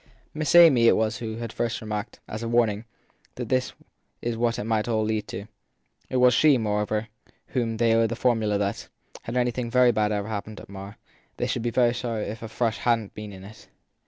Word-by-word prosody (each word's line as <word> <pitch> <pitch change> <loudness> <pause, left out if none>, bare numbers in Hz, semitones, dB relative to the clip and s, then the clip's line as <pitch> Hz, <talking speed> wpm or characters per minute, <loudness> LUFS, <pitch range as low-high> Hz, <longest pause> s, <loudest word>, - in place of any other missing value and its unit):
Miss 155 +1 0
Amy 145 -9 +8
it - - +6
was 110 0 0
who 110 -2 -5
had 115 -1 -6
first 120 -1 -2
remarked, 105 0 -5
as 110 - -6
a 115 - -3
warning, 115 -2 +1 0.5
that - - -5
this 130 -1 0 0.5
was 120 -1 -1
what 115 0 0
it - - -3
might 110 0 0
all 110 -2 +1
lead 110 -1 -1
to. 100 - -6 0.6
It - - -4
was 125 0 +5
she, 150 +1 +5
moreover, 105 -1 0 0.3
to - - -29 0.2
whom 115 -3 -1
they 115 0 +3
owed 115 0 +3
the 115 - -3
formula 110 -4 +1
that, 100 0 -3 0.3
had 115 +2 -4
anything 125 -1 0
very 125 0 +5
bad 105 -1 +1
ever 100 -1 -2
hap 105 -2 -4
pened 110 -1 -9
at - - -13
Marr, 100 +1 -9 0.4
they - - -1
should - - -2
be 120 +1 -1 0.2
sorry 115 -3 -3
if 110 +2 -6
a 115 - -5
Frush 110 0 -1
hadn 115 -4 +1
t - - -39
been 105 -1 -8
in 95 -1 -11
it. 105 +3 -13
115 Hz, 220 wpm, -25 LUFS, 105-120 Hz, 0.6 s, Amy